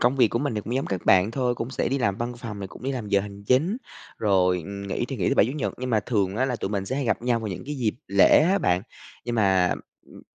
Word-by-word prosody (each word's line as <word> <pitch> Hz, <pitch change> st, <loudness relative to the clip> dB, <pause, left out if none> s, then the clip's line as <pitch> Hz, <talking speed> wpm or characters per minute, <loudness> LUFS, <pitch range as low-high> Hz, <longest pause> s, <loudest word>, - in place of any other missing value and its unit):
công 125 Hz, +3 st, +2 dB
việc 125 Hz, -4 st, +5 dB
của 115 Hz, -, -1 dB
mình 140 Hz, -3 st, -1 dB
thì 105 Hz, -, -1 dB
cũng 115 Hz, +4 st, -5 dB
giống 135 Hz, -, -1 dB
các 95 Hz, -3 st, -3 dB
bạn 95 Hz, +2 st, +5 dB
thôi, 125 Hz, 0 st, 0 dB
cũng 115 Hz, +1 st, -5 dB
sẽ -, -, -1 dB
đi 135 Hz, +2 st, 0 dB
làm 100 Hz, -5 st, 0 dB
văn 120 Hz, +2 st, -3 dB
phòng 115 Hz, -4 st, -7 dB
rồi 95 Hz, -1 st, -6 dB
cũng -, -, -13 dB
đi 135 Hz, -, -2 dB
làm 120 Hz, -6 st, -4 dB
giờ 100 Hz, -, +3 dB
hành 100 Hz, 0 st, -9 dB
chính, 150 Hz, -, +2 dB, 0.4 s
rồi, 95 Hz, -4 st, +3 dB
ừm, 100 Hz, 0 st, -7 dB
nghỉ 95 Hz, -, -2 dB
thì -, -, -5 dB
nghỉ -, -, 0 dB
thứ -, -, +2 dB
Bảy, -, -, +5 dB
Chủ 125 Hz, -, -3 dB
nhật, 145 Hz, -2 st, -2 dB
nhưng 125 Hz, 0 st, -3 dB
mà 110 Hz, -2 st, +3 dB
thường 100 Hz, -4 st, -1 dB
á 130 Hz, -, +2 dB
là 125 Hz, -2 st, -1 dB
tụi 95 Hz, -, -3 dB
mình 100 Hz, -2 st, -2 dB
sẽ 130 Hz, -, -2 dB
hay 140 Hz, -, -1 dB
gặp 115 Hz, -, 0 dB
nhau 120 Hz, -1 st, +1 dB
vào 110 Hz, -, -4 dB
những 95 Hz, -, -5 dB
cái 150 Hz, -, -3 dB
dịp 120 Hz, -6 st, -1 dB
lễ 100 Hz, 0 st, +6 dB
á 190 Hz, +5 st, +3 dB
bạn. 90 Hz, -, +1 dB, 0.4 s
Nhưng 120 Hz, -, -2 dB
mà, 95 Hz, -5 st, +3 dB, 0.3 s
ưm, -, -, -15 dB
115 Hz, 305 wpm, -25 LUFS, 100-130 Hz, 0.4 s, lễ